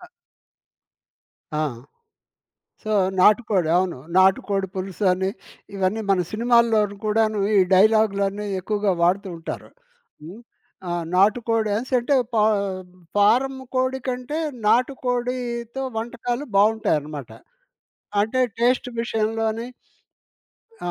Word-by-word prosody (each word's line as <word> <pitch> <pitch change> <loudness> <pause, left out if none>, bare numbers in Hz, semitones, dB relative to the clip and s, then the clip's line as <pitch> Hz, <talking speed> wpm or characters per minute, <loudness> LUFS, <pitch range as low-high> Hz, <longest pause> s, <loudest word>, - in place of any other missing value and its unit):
అ 355 - -13 1.5
ఆ! 155 0 0 1.2
సో 215 - -3 0.3
నాటికోడి 205 -4 +3
అవును. 180 -6 0 0.2
నాటుకోడి 190 +1 +3
పులుసు 190 +2 -4
అని 190 +1 -1 0.5
ఇవన్నీ 195 +3 0
మన 190 - +3
సినిమాల్లోను 225 -2 +2
కూడాను 215 0 +1 0.2
ఈ - - +6 0.2
డైలాగు‌లన్నీ 205 0 +3
ఎక్కువగా 205 0 0
వాడుతూ 190 +4 +2
ఉంటారు. 165 - -7 0.5
హ్మ్. 180 +8 -10 0.5
ఆ! - - -1 0.2
నాటుకోడి 215 +2 +2 0.2
సేట్టే 255 +2 +2 0.2
పా 215 - +3 0.7
ఫారం 250 +7 +3 0.2
కోడి 260 +1 0
కంటే 255 +4 -3 0.3
నాటుకోడితో 245 0 -1
వంటకాలు 240 +4 -3
బావుంటాయన్నమాట. 160 - +1 0.9
అంటే 225 +5 0 0.2
టేస్ట్ 245 +2 +2
విషయంలోని 225 0 -1 1.2
ఆ! - - -1
220 Hz, 90 wpm, -23 LUFS, 195-240 Hz, 1.5 s, ఈ